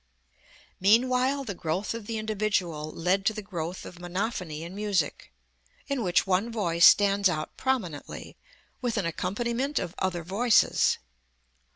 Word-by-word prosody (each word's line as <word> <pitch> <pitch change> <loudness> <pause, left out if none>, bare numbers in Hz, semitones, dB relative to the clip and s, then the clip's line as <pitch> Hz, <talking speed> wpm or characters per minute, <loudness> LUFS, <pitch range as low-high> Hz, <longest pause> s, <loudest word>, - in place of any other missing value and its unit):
Meanwhile 255 +7 +3
the 215 -6 -4
growth 175 +5 -2
of 230 -3 -7
the 225 - -3
individual 200 -8 -1
led 180 +5 0
to 220 - +3
the 215 - -5
growth 175 -3 -5
of 180 - -10
monophony 175 -3 -3
in 170 +2 -8
music, 200 -5 -1 0.6
in 280 -3 -1
which 180 -5 +2
one 195 +5 +1
voice 175 -6 +5
stands 200 -1 +5
out 155 -3 -3
prominently, 215 - -3 0.5
with 240 -3 -1
an 200 - 0
accompaniment 235 - -2
of 170 - -2
other 180 -3 -1
voices. 215 +7 +3
200 Hz, 140 wpm, -27 LUFS, 175-230 Hz, 0.6 s, voice